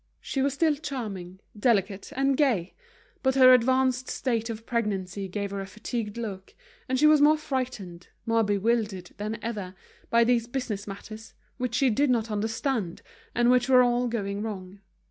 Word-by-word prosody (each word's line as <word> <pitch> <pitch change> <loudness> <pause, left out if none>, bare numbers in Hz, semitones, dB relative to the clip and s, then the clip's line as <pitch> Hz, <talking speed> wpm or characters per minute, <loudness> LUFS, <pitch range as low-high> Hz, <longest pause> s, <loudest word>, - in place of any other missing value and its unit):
She 270 - -3
was 275 0 +1
still 315 +1 +3
charming, 205 - -6
delicate, 205 -3 0
and 275 +1 +2
gay; 235 - +1 0.5
but 265 0 +1
her 255 -1 +8
advanced 255 +1 +2
state 230 -3 -1
of 225 0 -6
pregnancy 200 -5 -2
gave 200 +1 -4
her 200 0 -3
a 195 - -6
fatigued 220 +1 -5
look, 200 -5 -6 0.3
and 260 - +1
she 300 - +4
was 305 -1 +6
more 305 +1 +6
frightened, 250 - -4 0.2
more 230 0 +2
bewildered 205 -2 0
than 215 +2 -3
ever, 205 -5 -4 0.3
by 235 0 +5
these 235 -1 +2
business 240 -6 -4
matters, 215 +2 -9 0.2
which 250 -2 -2
she 265 -2 +3
did 280 +6 +2
not 230 -3 +1
understand, 220 -2 -2 0.3
and 240 +1 +4
which 250 0 +3
were 255 -1 +7
all 245 0 +1
going 205 -4 -3
wrong. 195 -3 -6
230 Hz, 165 wpm, -27 LUFS, 200-255 Hz, 0.5 s, her